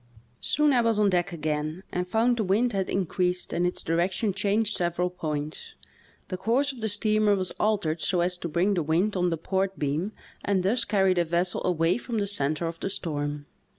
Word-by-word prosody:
Soon 300 -1 +2
I 245 - +4
was 230 -2 +2
on 205 -2 +3
deek 175 -1 +1
again 155 +1 -3
and 180 0 -2
found 235 +5 +2
the 220 - +1
wind 210 +5 +2
had 195 -1 -1
increased 180 -1 -1
and 175 +1 +1
its 180 - -5
direction 180 +5 0
changed 205 +3 +1
several 175 0 0
points. 155 -3 -5 0.5
The 185 - -3
course 240 +9 +1
of 245 - -11
the 220 - 0
steamer 215 0 +2
was 185 -2 -1
altered 185 -7 0
so 180 -2 +1
as 180 +1 +1
to 170 - -4
bring 175 +6 +2
the 180 - +1
wind 170 +7 +1
on 180 -1 +2
the 165 - -1
port 190 +3 -1
beam 155 +9 -1 0.3
and 195 -2 +1
thus 230 +6 +1
carry 190 -2 +3
the 175 -1 +2
vessel 175 +2 0
away 170 +3 +2
from 240 -2 -4
the 205 - +1
center 155 -5 -1
of 165 0 -4
the - - -2
storm. 145 -5 -3
185 Hz, 205 wpm, -27 LUFS, 170-210 Hz, 0.5 s, I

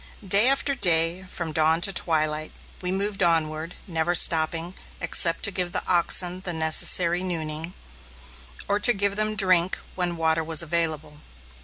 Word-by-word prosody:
Day 200 +7 +5
after 275 +1 0
day, 175 -4 +1
from 170 -3 -5
dawn 160 +1 +1
to 195 +2 +2
twilight, 155 -2 -1 0.3
we 180 -1 -3
moved 200 +1 -3
onward, 165 -1 0
never 170 0 -2
stopping, 165 +1 +3 0.3
except 165 0 +1
to 200 - +2
give 180 -2 -3
the - - -3
oxen 180 +1 +1
the 175 - -5
necessary 170 +2 +2
nooning, 165 -2 -5 0.9
or 205 - 0
to 240 +3 +4
give 200 -1 -1
them 215 0 +1
drink 185 -3 +2 0.2
when 175 -2 -2
water 160 0 0
was 160 +1 0
available. 155 -2 -2
170 Hz, 150 wpm, -23 LUFS, 160-185 Hz, 0.9 s, Day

